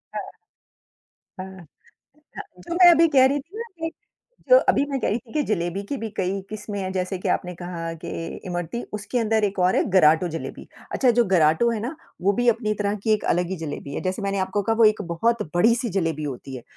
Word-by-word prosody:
हाँ। - - -4 1.1
हाँ। 185 - -4 0.9
हाँ, - - -4 0.3
तो 340 - -2
मैं 355 0 +8
अभी 335 -1 +5
कह 265 -4 +5
रही 280 +2 +1
थी 335 +9 -15
ना - - -2 0.2
कि, 325 0 -3 0.6
जो - - +10
अभी 275 - +2
मैं 275 - -1
कह - - 0
रही 215 - 0
थी 240 -2 -18
कि 305 - +1
ज़लेबी 180 -1 -1
के 280 - -2
भी 225 - -4
कई 190 +1 -1
किस्में 210 -1 -5
हैं, 185 -1 -3
जैसे 185 0 -2
कि - - -3
आपने 180 0 -1
कहा 170 -1 -5
कि - - -5 0.4
इमरती, 175 +6 -4
उसके 210 +4 -2
अंदर 220 -1 +1
एक 200 -1 -2
और 180 +1 +3
है - - +3
गराटो 175 -2 +5
ज़लेबी। 165 0 -7 0.3
अच्छा 255 - +3
जो 240 - +6
गराटो 165 +6 +4
है 225 -2 -2
ना, 245 +8 -4 0.3
वो 200 +2 +3
भी 245 0 +2
अपनी 220 -2 +1
तरह 205 0 -1
की 220 - +3
एक 215 - 0
अलग 175 0 0
ही 190 - -2
ज़लेबी 145 -3 -6
है, - - -3
जैसे 185 +3 -2
मैंने 200 0 -1
आपको 190 +2 -1
कहा 225 +3 0
वो 230 - +5
एक 215 -1 +4
बहुत 230 +6 +1
बड़ी 225 +7 +5
सी 235 0 -2
ज़लेबी 160 -4 -1
होती 135 -1 -6
है 125 - -9
200 Hz, 230 wpm, -23 LUFS, 180-235 Hz, 1.1 s, जो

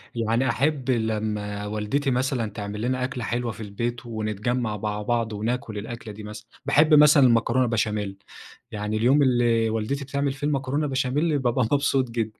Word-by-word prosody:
يعني 115 +3 +1
أحب 135 -1 0
لما 105 -3 -2
والدتي 110 +7 -1
مثلًا 125 -3 0
تعمل 105 0 -5
لنا 125 +1 -1
أكلة 125 -2 -3
حلوة 120 0 -2
في 110 - -8
البيت 115 +4 -4
ونتجمع 110 +1 -2
مع 105 0 -3
بعض 115 0 -1
وناكل 110 +1 -3
الأكلة 110 +1 -7
دي 105 +1 -10
مثلًا، 105 +1 -9 0.2
باحب 155 +2 +4
مثلًا 150 -1 +7
المكرونة 120 +1 +3
بشاميل، 105 -3 -1 0.5
يعني 105 0 -2
اليوم 130 +6 +4
اللي 120 -3 +2
والدتي 115 +6 -2
بتعمل 140 0 -1
فيه 145 +2 -3
المكرونة 145 +1 -1
بشاميل 140 +3 0
بابقى 125 -2 +1
مبسوط 140 -3 +2
جدًا، 110 -2 -3
120 Hz, 160 wpm, -25 LUFS, 110-135 Hz, 0.5 s, مثلًا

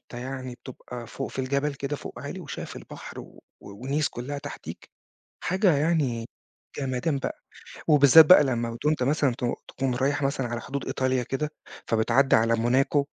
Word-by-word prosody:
أنت - - -16
يعني 130 0 -5
بتبقى 125 -1 -9
فوق 135 +4 -5
في - - -10
الجبل 140 +2 0
كده 140 +1 -3
فوق - - -9
عالي - - -6
وشايف - - -7
البحر - - -9
و - - -14 0.2
ونيس 135 +9 -2
كلّها 135 +4 -5
تحتيك. 145 0 -9 0.6
حاجة 185 -1 +3
يعني 140 -7 +1 0.5
جمدان 135 +2 -1
بقى. - - -4 0.5
وبالذات 150 +1 +8
بقى 150 -2 +8
لمّا 120 -3 -1
وأنت 150 -4 +2
مثلًا 140 0 +2
ت 125 - -4 0.2
تكون 130 -2 -2
رايح 140 +4 0
مثلًا 135 -2 0
على 120 0 -4
حدود 140 0 -5
إيطاليا 130 -1 0
كده، 140 +5 -2 0.4
فبتعدي 115 +5 +3
على 115 +1 +3
موناكو 130 +5 +2
135 Hz, 160 wpm, -26 LUFS, 125-145 Hz, 0.6 s, وبالذات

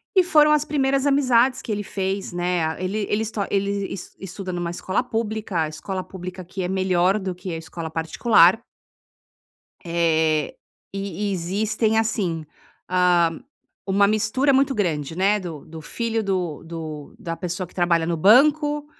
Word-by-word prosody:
E 370 - +6
foram 305 -4 +5
as 300 0 +3
primeiras 275 -1 +1
amizades 260 -2 +3
que 225 - -6
ele 205 0 -2
fez, 195 -1 -3
né? 175 -1 0
Ah, 160 - -3
ele 200 +3 -2
ele 210 +1 +1
esto 220 -1 -4
ele 200 0 0
es 195 - -9
estuda 190 0 -6
numa 175 -1 -3
escola 190 +7 -1
pública, 220 -6 -2
a 155 - 0
escola 185 +5 -5
pública 185 0 -8
aqui 185 +2 -6
é - - -1
melhor 185 +1 +2
do 190 -2 -3
que 180 +1 -7
a - - -3
escola 160 0 -7
particular. 170 +5 +4 1.3
Eh, 160 -2 +1 0.4
e - - -4 0.3
e - - -1
existem 215 +5 0
assim. 195 -8 -1 0.4
Ah, 180 -2 +3 0.5
uma 200 +1 +3
mistura 225 +7 +2
muito 270 +1 +2
grande, 160 -7 -1
né, 200 +3 +2
do 165 -6 -8
do 160 0 -10
filho 225 +6 -2
do 180 -6 -2
do 160 -3 -7
da 165 -1 -5
pessoa 180 +1 -4
que - - -21
trabalha 170 -2 +2
no 170 0 -1
banco, 290 - +4
190 Hz, 165 wpm, -23 LUFS, 170-220 Hz, 1.3 s, E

